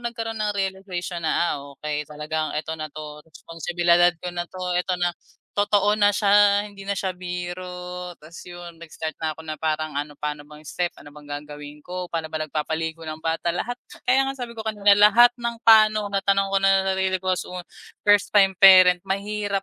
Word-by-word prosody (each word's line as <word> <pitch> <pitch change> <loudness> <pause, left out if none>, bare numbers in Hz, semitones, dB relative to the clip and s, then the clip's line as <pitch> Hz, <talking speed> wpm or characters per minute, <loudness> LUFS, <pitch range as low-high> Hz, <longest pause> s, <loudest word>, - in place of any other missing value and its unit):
nagkaroon 225 -2 -5
ng 210 -1 0
realization 190 -2 -4
na, 170 +1 +1
"ah, - - -3 0.2
okey 150 -1 -4
talagang 150 +1 -4
eto 160 +1 -3
na 155 -1 -5
'to, 150 0 -9
responsibilidad 170 +2 +1
ko 180 +1 -7
na 175 0 -4
'to, 185 -1 -4
eto 180 0 -2
na, 175 0 0 0.4
totoo 205 0 +2
na 205 -1 +4
siya 205 0 +4
hindi 200 -1 -12
na 200 0 -3
siya 190 -1 -2
biro," 180 0 -6
ta's 155 +2 -12
yun 175 -1 -10
nag-start 160 -1 -7
na 155 -1 -2
ko - - -8
na 155 - -4
parang 155 -1 -2
ano 145 0 -5
paano 150 0 -4
bang 150 0 -15
step, 175 +1 -2
ano 145 - -14
bang 150 -1 -14
gagawin 145 0 -8
ko, 180 +3 -7
paano 165 -1 -3
ba 155 0 -4
nagpapaligo 160 +2 -4
ng 155 0 -7
bata, 165 +1 -1
lahat, 245 +6 -4 0.2
kaya 265 +2 +3
nga 270 - -3
sabi 245 -3 -6
ko 220 - -6
kanina 205 -1 +3
lahat 230 +4 +7
ng 235 0 -3
pa'no 215 -2 +5
natanong 195 0 +1
ko 195 - +2
na 195 0 +3
sarili 190 0 0
ko 185 - 0
as - - -6 0.6
first 205 0 +3
time 195 -2 +6
parent 185 -2 +8
mahirap 200 0 -2
180 Hz, 190 wpm, -23 LUFS, 160-200 Hz, 0.6 s, parent